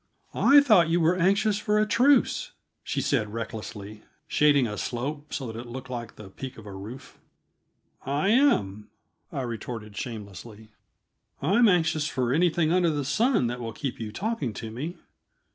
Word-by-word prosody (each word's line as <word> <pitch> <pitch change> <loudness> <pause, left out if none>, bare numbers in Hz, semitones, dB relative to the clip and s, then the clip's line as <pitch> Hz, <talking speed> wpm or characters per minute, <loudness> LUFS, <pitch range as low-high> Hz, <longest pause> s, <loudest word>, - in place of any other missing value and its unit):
"I 285 +1 +6
thought 210 - +5
you 170 +1 +2
were 170 +2 +3
anxious 200 +4 +2
for 210 0 +1
a 215 - +3
truce," 260 +6 +2 0.3
she - - -2
said 110 -7 0
recklessly, 110 -2 -7 0.3
shading 145 -3 +4
a 105 -2 -4
slope 145 +7 -4
so 135 - -3
that 110 -2 -6
it 120 - -8
looked 130 +2 -8
like 120 -2 -6
the 100 -3 -12
peak 130 +5 -8
of 110 - -12
a 100 - -8
roof. 105 +7 -10 0.8
"I 145 +8 0
am," 105 - +2 0.4
I - - -3
retorted 115 -3 -6
shamelessly. 110 -3 -8 0.7
"I'm 205 - +4
anxious 160 -5 +2
for 125 -3 -1
anything 165 0 +2
under 180 -2 +3
the 145 -3 -2
sun 220 - +2
that 120 +1 -3
will 115 -2 -5
keep 135 +2 -5
you 110 -2 -5
talking 175 - -3
to 110 +1 -7
me. 155 +10 -5
135 Hz, 165 wpm, -26 LUFS, 115-175 Hz, 0.8 s, I